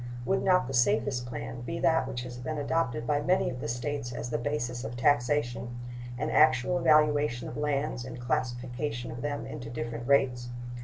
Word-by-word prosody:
Would 195 - +2
not 185 -6 +4
the 135 - -5
safest 120 +1 +2
plan 120 -1 -5
be 165 +7 -4
that 160 0 +3
which 120 - -4
has 125 -1 -7
been 155 +5 -3
adopted 140 -5 0
by 145 +2 +1
many 180 0 +2
of 125 - -6
the - - -3
States 125 +2 -3
as 120 0 -5
the - - 0
basis 125 -2 -2
of 115 +2 -5
taxation 120 -3 +1 0.4
an - - -1
actual 155 +3 +4
valuation 150 -5 +3
of - - -7
lands 145 -3 -1
and 125 -1 -7
classification 125 0 -2
of 120 +1 -6
them 145 +1 -2
into 125 -6 -7
different 120 0 -4
rates? 125 -3 +3
125 Hz, 185 wpm, -29 LUFS, 120-145 Hz, 0.4 s, not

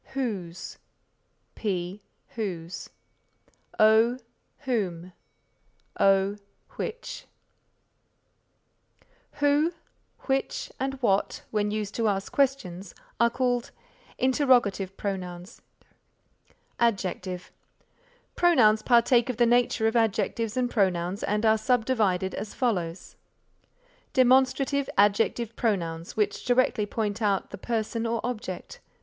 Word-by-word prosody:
Whose 195 -10 -4 0.7
P. 190 -1 -3 0.3
Whose 180 -6 -5 0.9
O. 220 +3 +5 0.4
Whom 185 -10 -2 0.9
O. 195 +1 +3 0.3
Which 470 +2 -6 2.1
Who, 290 +3 +2 0.5
which 270 0 -2
and 270 +1 -2
what 195 -3 +1
when 210 -1 0
used 210 -1 -3
to 230 -1 0
ask 195 -1 -1
questions 200 -10 -1 0.2
are 235 - +5
called 245 -1 -1 0.5
Interrogative 245 -8 +2
Pronouns. 180 -2 -5 1.2
Adjective 185 -5 -1 0.8
Pronouns 230 -12 +4
partake 240 +1 +4
of 250 - -2
the 240 - +4
nature 240 -1 +2
of 225 +1 +1
adjectives 225 +1 0
and 250 -1 +2
pronouns 185 -2 0
and 210 +2 0
are 220 0 +4
subdivided 220 -6 +1
as 205 +1 -6
follows: 185 -8 -2 1.0
Demonstrative 265 +2 +3
Adjective 210 +3 +2
Pronouns 170 -7 -2
which 205 -2 0
directly 245 -4 +2
point 215 0 -2
out 200 -3 0
the - - -7
person 230 +1 -2
or 230 0 -1
object. 245 - -5
220 Hz, 95 wpm, -27 LUFS, 195-245 Hz, 2.1 s, O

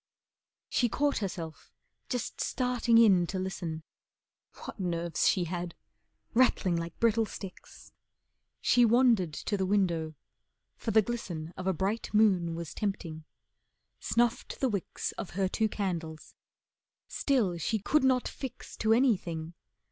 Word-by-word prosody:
She 240 - +1
caught 285 +4 +1
herself 170 -5 -6 0.4
just 245 -3 -3
starting 250 -3 +2
in 195 -7 +6
to 190 - -3
listen. 175 -4 -4 0.8
What - - -8
nerves 170 -3 0
she 185 - +2
had: 175 0 -4 0.6
rattling 230 -7 +3
like 170 0 -4
brittle 225 -1 +3
sticks! 195 -3 -10 0.7
She 245 - +4
wandered 230 -7 +4
to 205 +7 -3
the 190 - 0
window, 170 -6 +1 0.6
for - - -5
the 220 0 +5
glisten 175 -8 -5
Of 185 - -5
a 190 - +3
bright 195 +6 -2
moon 185 -6 +3
was 170 -2 -6
tempting. 165 -6 -4 0.7
Snuffed 235 -1 0
the 265 - +2
wicks 200 -5 -3
Of 195 - -5
her 195 -1 +2
two 220 +3 0
candles. 165 -6 -4 0.7
Still 215 -12 0
she 220 +7 0
could 265 +8 +2
not 260 -1 +3
fix 260 -2 -8
To 220 0 +3
anything. 180 -10 +1
195 Hz, 135 wpm, -30 LUFS, 170-230 Hz, 0.8 s, in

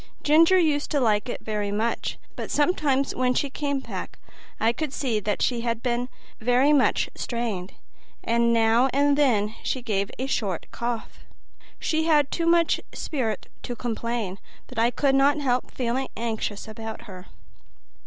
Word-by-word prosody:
Ginger 330 +5 +6
used 300 -5 +2
to 290 - +1
like 220 -1 +2
it - - -4
very 210 -2 -2
much, 220 +3 -1 0.2
but - - -5
sometimes 290 -3 +1
when 250 0 +1
she 285 - 0
came 285 -1 -1
back - - -7 0.4
I 225 +1 +3
could 300 +1 -3
see 245 -7 0
that 210 0 -1
she 240 -2 +1
had 230 -1 -2
been 245 0 -1 0.3
very 250 +6 +4
much 275 -3 +3
strained, 220 -6 -3 0.5
and 235 0 +2
now 230 +3 +4
and 285 +1 +4
then 220 -8 +2
she 260 - -2
gave 200 -4 -1
a 260 - -2
short 200 -10 -2
cough. 235 -1 -4 0.6
She 320 0 0
had 300 -4 +3
too 335 -1 -1
much 335 -1 +3
spirit 250 -8 -3 0.2
to 245 - -5
complain, 230 -4 -3 0.3
but - - -6
I 230 +1 +4
could 270 +3 +1
not 275 +2 +4
help 255 -3 0
feeling 255 +1 -2
anxious 220 -2 -3
about 220 0 -7
her. 185 -2 -11
245 Hz, 160 wpm, -25 LUFS, 225-280 Hz, 0.6 s, Ginger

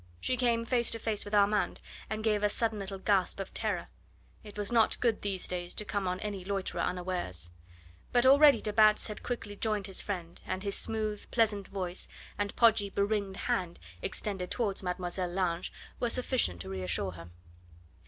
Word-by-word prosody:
She 255 - 0
came 235 -2 +2
face 240 -1 +2
to 230 - -1
face 220 -2 -1
with 205 +1 -2
Armand, 205 +1 +3 0.3
and 215 +1 -3
gave 210 -2 +2
a 210 - +3
sudden 220 0 0
little 195 0 -5
gasp 190 -1 +1
of 195 - -5
terror. - - -1 0.6
It 210 -1 -11
was 205 +1 +1
not 230 -2 +3
good 230 -3 +1
these 195 -3 -2
days 175 -1 -4
to 210 - -2
come 205 -2 -1
on 180 0 -1
any 200 -3 -4
loiterer 190 -2 -2
unawares. 175 - -3 0.6
But 245 0 +4
already 285 +2 +7
de 210 - -2
Batz 215 0 +5
had 210 - -6
quickly 220 -4 -4
joined 210 -1 -1
his 190 -1 -2
friend, 175 -4 -5
and 185 - -3
his 200 -1 -1
smooth, 215 -2 -1
pleasant 210 -4 +1
voice, 185 -2 -4 0.3
and 205 0 -2
podgy, 225 -3 +4
beringed 200 -1 0
hand 175 -2 -1 0.2
extended 190 -4 -2
towards 210 -5 0
Mlle. 180 0 -2
Lange, 175 -1 -1 0.3
were 240 - +1
sufficient 245 - +1
to - - -6
reassure 95 0 -1
her. 85 -1 -10
200 Hz, 180 wpm, -31 LUFS, 185-220 Hz, 0.6 s, already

